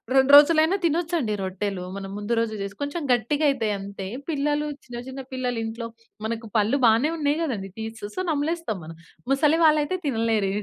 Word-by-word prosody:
2 265 +1 +5
రోజులైనా 315 +4 +6
తినొచ్చండి 330 -7 0
రొట్టెలు. 190 0 -3
మనం 195 -1 -6
ముందు 210 +3 -2
రోజు 225 -1 -1
జేసుకు 200 +5 -6
కొంచెం 285 +4 -3
గట్టిగయితయి 245 -2 +1
అంతే. 195 -1 -7 0.2
పిల్లలు, 295 0 0 0.2
చిన్న 240 -1 -7
చిన్న 265 +1 -6
పిల్లలు 250 -2 -2
ఇంట్లో 230 +1 -5 0.4
మనకు 225 0 -4
పళ్ళు 215 +7 +2
బానే 230 +7 +4
ఉన్నాయి 295 0 +1
గదండీ 205 -10 -3
టీత్సు. 220 -1 -6
సో, - - -3
నమలేస్తాం 300 - -1
మనం. 165 +1 -9 0.4
ముసలి 300 +4 +3
వాళ్ళయితే 305 +4 +3
తినలేరు 225 -5 +1
245 Hz, 160 wpm, -24 LUFS, 215-295 Hz, 0.4 s, రోజులైనా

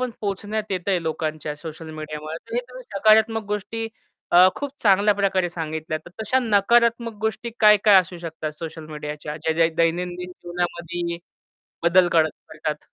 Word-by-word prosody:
पण 255 -1 -1
पोहोचण्यात 210 +1 -3
येतं 185 +1 -1
आहे 180 -3 +1
लोकांच्या 155 -1 -3
सोशल 160 +1 -8
मीडियामुळे. 155 0 -6
तर 230 - -7
हे 245 - +2
तुम्ही 255 0 -10
सकारात्मक 220 +1 +3
गोष्टी 225 +2 -3 0.5
अ, 180 +1 +9
खूप 285 -1 -4
चांगल्या 205 0 +5
प्रकारे 190 -3 +1
सांगितल्या, 160 -1 -4
तर 165 +3 -15
तशा 235 +5 +2
नकारात्मक 235 +1 +3
गोष्टी 220 +2 -2
काय-काय 210 -1 +6
असू 180 -1 -8
शकतात 160 -2 -5
सोशल 160 -1 -7
मीडियाच्या 150 0 -6
ज्या 160 +1 -1
ज्या 165 0 +4
दैनंदिन 175 +2 0
जीवनामध्ये 175 -1 -4 0.6
बदल 175 +1 +5
कर 160 -2 +4 0.2
करतात? 155 -1 -4
180 Hz, 155 wpm, -23 LUFS, 160-210 Hz, 0.6 s, अ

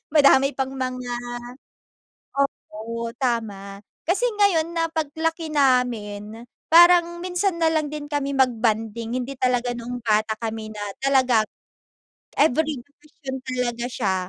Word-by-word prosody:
madami 275 -1 +5
pang 265 0 -2
mga 255 -2 -4 1.6
oo 230 +2 -5
tama, 205 -6 -2 0.3
kasi 395 +8 +2
ngayon 340 -5 +3
na 330 0 +1
pag 320 -1 -1
laki 325 0 -2
namin, 230 -5 0 0.3
parang 345 0 +6
minsan 360 0 -1
na 325 -1 +4
lang 310 -2 +1
din 295 -1 -5
kami 285 -1 -1
mag-bonding. 230 -2 0
Hindi 260 +3 -5
talaga 250 -1 +1
noong 245 +1 -6
bata 215 -1 +2
kami 220 -1 -4
na 210 - -7 0.2
talagang 260 -5 +3 0.9
every 305 0 +2
bakasyon 285 -1 -9
talaga 245 -2 -2
siya. 205 -6 -1
255 Hz, 120 wpm, -23 LUFS, 230-310 Hz, 1.6 s, parang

